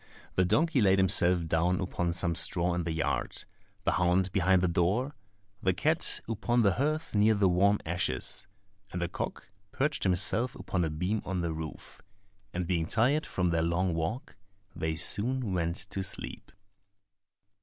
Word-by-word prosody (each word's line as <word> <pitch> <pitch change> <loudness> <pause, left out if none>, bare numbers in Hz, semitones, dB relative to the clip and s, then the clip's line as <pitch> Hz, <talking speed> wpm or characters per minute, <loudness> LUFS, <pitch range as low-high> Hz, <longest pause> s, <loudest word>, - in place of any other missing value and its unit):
The 95 - +2
donkey 155 - +2
laid 95 -2 +4
himself 90 -2 +3
down 85 +3 +1
upon 90 -2 -2
some 85 -1 -1
straw 85 +1 +1
in 85 -1 -2
the 85 - -2
yard, 80 0 -2 0.4
the - - +2
hound 90 +1 +1
behind 95 -1 +3
the - - +3
door, 95 - 0 0.5
the 95 -4 +2
cat - - +1
upon 115 +2 +1
the 100 - +4
hearth 155 - -1
near 105 +1 +4
the 100 -1 +3
warm 100 +3 +3
ashes, 85 +3 0 0.4
and 90 - -4
the 85 - -1
cock 90 - -5 0.2
perched 145 +1 -1
himself 105 +6 +2
upon 90 -2 -2
a 80 - 0
beam 90 +8 -2
of 95 -1 -3
the 85 -1 -2
roof; 80 -1 -8 0.5
and 90 -1 -3
being 85 -2 -1
tired 135 - +2
from 90 -2 0
their 85 -1 +1
long 85 +2 0
walk, 85 +11 -3 0.4
they 80 0 -2
soon 110 +6 +1
went 85 -1 -1 0.2
to 95 - -1
sleep. 95 - -5
90 Hz, 165 wpm, -29 LUFS, 85-105 Hz, 0.5 s, laid